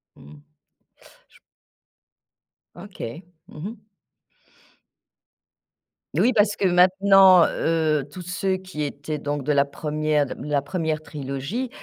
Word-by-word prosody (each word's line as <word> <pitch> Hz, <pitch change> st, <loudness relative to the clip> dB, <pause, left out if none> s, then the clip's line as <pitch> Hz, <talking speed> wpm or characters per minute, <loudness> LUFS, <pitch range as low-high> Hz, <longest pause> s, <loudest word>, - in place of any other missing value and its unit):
Mmh. 75 Hz, 0 st, -15 dB, 0.9 s
J -, -, -23 dB, 1.4 s
OK. 175 Hz, -, -8 dB, 0.2 s
Mmh -, -, -13 dB
mh. 210 Hz, +5 st, -8 dB, 2.3 s
Oui, 250 Hz, -, +3 dB
parce 210 Hz, -2 st, +2 dB
que -, -, -1 dB
maintenant, 185 Hz, 0 st, +6 dB
heu, 155 Hz, -4 st, 0 dB
tous 180 Hz, +5 st, -9 dB
ceux 185 Hz, +2 st, -2 dB
qui 185 Hz, -5 st, -6 dB
étaient 145 Hz, +1 st, -5 dB
donc 145 Hz, -1 st, -4 dB
de 150 Hz, -, 0 dB
la 140 Hz, -1 st, +3 dB
1re 150 Hz, 0 st, -1 dB
de -, -, -10 dB
m -, -, -10 dB
la 145 Hz, -1 st, 0 dB
1re 155 Hz, +1 st, -3 dB
trilogie, 145 Hz, -, -5 dB
155 Hz, 115 wpm, -23 LUFS, 145-185 Hz, 2.3 s, maintenant